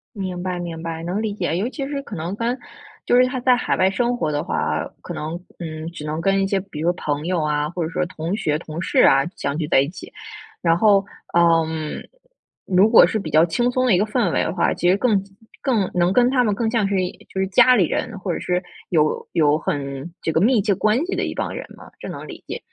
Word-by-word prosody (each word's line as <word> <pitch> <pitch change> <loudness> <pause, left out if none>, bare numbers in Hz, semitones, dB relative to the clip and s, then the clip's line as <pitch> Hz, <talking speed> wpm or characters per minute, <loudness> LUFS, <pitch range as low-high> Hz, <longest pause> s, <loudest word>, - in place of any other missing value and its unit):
明 185 -3 -4
白， 180 -1 -3
明 165 -2 -5
白， 165 0 -5
能 185 +5 -2
理 215 -2 -2
解， 175 -5 -2
尤 210 +6 0
其 275 -1 -5
是 280 -1 -3
可 230 - -8
能 170 +5 -4
跟， 235 +3 -1 0.5
就 245 - +3
是 250 - +6
他 255 0 -3
在 250 0 +4
海 - - 0
外 185 0 +4
生 240 +5 0
活 155 -6 -1
的 145 0 -1
话 - - -3
啊， - - -1
可 - - -7
能， 160 +3 -5 0.2
嗯， 160 -1 -6
只 170 -3 -9
能 155 +1 -3
跟 195 +3 +2
一 - - +1
些 195 -1 +1
比 185 -6 -9
如 170 +2 +2
朋 150 -3 -3
友 180 -3 0
啊， 150 0 0
或 175 0 -3
者 160 - -2
说 180 0 -1
同 170 +2 -4
学、 155 -8 0
同 160 +1 -7
事 - - 0
啊， 135 0 +5
相 140 +1 -3
聚 155 -2 -2
在 - - +4
一 140 - 0
起。 185 - -11 0.5
然 165 -1 +3
后， 200 -1 +4 0.3
嗯， 160 -2 +2 0.6
如 195 +3 +4
果 230 - +8
是 220 - -1
比 160 - -5
较 155 +3 +5
轻 240 +9 0
松 255 0 +1
的 235 - +4
一 - - +5
个 205 - +2
氛 215 -5 0
围 - - +2
的 165 - -2
话， 175 - +1
其 175 - +1
实 190 - +4
更 210 -4 +2 0.4
更 225 -9 +1
能 175 0 +2
跟 245 +3 +4
他 250 -2 +3
们 210 - +1
更 225 0 0
像 220 -5 +1
是 200 - -1 0.3
就 190 - -5
是 190 - +1
家 250 +5 +6
里 190 -7 +4
人， 225 -4 -3
或 180 -2 -2
者 - - -3
是 180 0 -1 0.3
有 155 -3 +1
有 150 -2 +3
很 140 +1 -4
这 160 - -1
个 160 - +1
密 235 +1 +4
切 200 -1 +1
关 215 +5 +2
系 380 - -3
的 - - -1
一 - - -4
帮 - - -3
人 - - -5
嘛， - - -14
这 - - -7
能 - - -7
理 - - -10
解。 - - -5
180 Hz, 275 characters per minute, -21 LUFS, 160-215 Hz, 0.6 s, 果